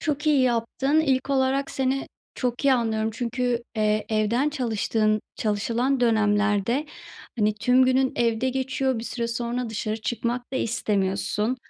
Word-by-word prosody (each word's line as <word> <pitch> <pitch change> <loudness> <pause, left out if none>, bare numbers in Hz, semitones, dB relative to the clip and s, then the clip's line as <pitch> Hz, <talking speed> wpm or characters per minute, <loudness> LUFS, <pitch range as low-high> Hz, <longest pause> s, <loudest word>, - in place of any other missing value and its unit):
Çok 295 0 -2
iyi 295 -3 +4
yaptın. 255 +5 +1
İlk 270 -3 0
olarak, 270 0 +1
seni 265 +1 -1 0.3
çok 250 +1 -2
iyi 275 - +5
anlıyorum 220 -2 0
çünkü, 245 +1 -2
eee, 215 0 +1
evden 225 +6 +1
çalıştığın, 220 -5 0 0.2
çalışılan 230 +5 0
dönemlerde, 215 +3 +2 0.5
hani, 210 -1 +2
tüm 250 +4 +3
günün 260 0 +2
evde 235 +1 +1
geçiyor, 265 -1 -1
bir 225 - -5
süre 235 -1 -3
sonra 235 0 -3
dışarı 215 0 -2
çıkmak 240 +3 -3
da - - -1
istemiyorsun. 210 0 -1
240 Hz, 140 wpm, -25 LUFS, 220-260 Hz, 0.5 s, iyi